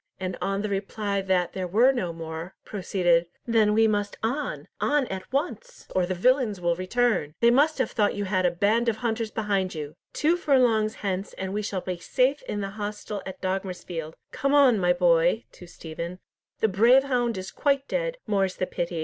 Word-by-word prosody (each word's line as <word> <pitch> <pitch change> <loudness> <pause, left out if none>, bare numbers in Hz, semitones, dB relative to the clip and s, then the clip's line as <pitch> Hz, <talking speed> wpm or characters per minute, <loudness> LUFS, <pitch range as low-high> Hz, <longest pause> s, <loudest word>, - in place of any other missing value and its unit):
and 185 -1 -3
on 195 +1 -1
the 210 - -2
reply 200 0 -2
that 185 -2 0
there 185 -1 -3
were 230 +9 +5
no 190 -10 -2
more, 165 +2 -7
proceeded, 175 -4 +1 0.2
"Then 225 -3 +3
we 220 +1 +4
must 205 -1 -1
on, 260 +7 -2
on 290 -2 +2
at 190 +3 -6
once, 360 - -3
or 185 -1 +2
the 185 - -2
villains 240 0 +2
will 170 -1 +1
return! 185 -4 0
They 235 0 +5
must 295 +5 +3
have 255 -4 0
thought 205 -2 +1
you 205 0 -2
had 185 -1 0
a 180 - +4
band 210 +7 +2
of 225 - 0
hunters 225 0 -2
behind 200 -4 -1
you. 150 -1 -6 0.2
Two 330 +3 +2
furlongs 240 -9 +2
hence, 195 0 -2
and 190 0 -5
we 210 - -1
shall 200 -3 -3
be 180 -1 -4
safe 260 +9 +1
in 205 - -2
the 195 0 -4
hostel 210 0 -5
at 190 - -8
Dogmersfield. 180 -4 -4 0.2
Come 275 +1 0
on, 260 -7 +6
my 180 -1 +3
boy," 175 +4 +3
to 180 - -13
Stephen, 170 +1 -7 0.4
"the 220 - +4
brave 230 +7 +5
hound 245 -5 0
is 185 0 -6
quite 280 -1 0
dead, - - -2
more's 195 -3 0
the 185 - -1
pity. 170 -2 -3
205 Hz, 195 wpm, -26 LUFS, 185-240 Hz, 0.4 s, on